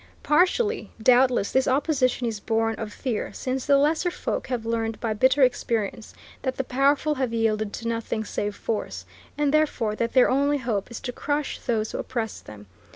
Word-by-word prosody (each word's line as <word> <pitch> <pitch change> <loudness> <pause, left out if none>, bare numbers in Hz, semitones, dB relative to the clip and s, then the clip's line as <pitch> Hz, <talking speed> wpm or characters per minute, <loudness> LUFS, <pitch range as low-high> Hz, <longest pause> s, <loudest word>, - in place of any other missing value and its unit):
Partially, 375 +8 +2
doubtless, 245 -2 +4
this 265 0 +2
opposition 260 -2 +1
is 225 -3 -2
born 225 +1 0
of 220 -2 -5
fear, 235 -1 -3
since 260 0 -3
the 280 -1 +6
lesser 310 +5 +2
folk - - -3
have 240 -3 -3
learned 225 -1 -2
by 225 -2 -1
bitter 260 +5 +4
experience 230 -3 -1 0.3
that 260 -1 -2
the 265 - 0
powerful 280 +4 +2
have 260 -4 -2
yielded 215 -2 0
to 230 - -5
nothing 230 -1 -2
save 205 0 -3
force, 220 -2 -4 0.3
and 295 -1 +1
therefore 285 -8 +1
that 230 +2 -2
their 255 - +6
only 285 +2 +2
hope 230 -6 -2
is 235 - -7
to 250 - -4
crush 290 +3 -2
those 220 -3 -1
who - - -4
oppress 230 -4 -4
them. 105 -1 -12
245 Hz, 180 wpm, -25 LUFS, 225-275 Hz, 0.3 s, the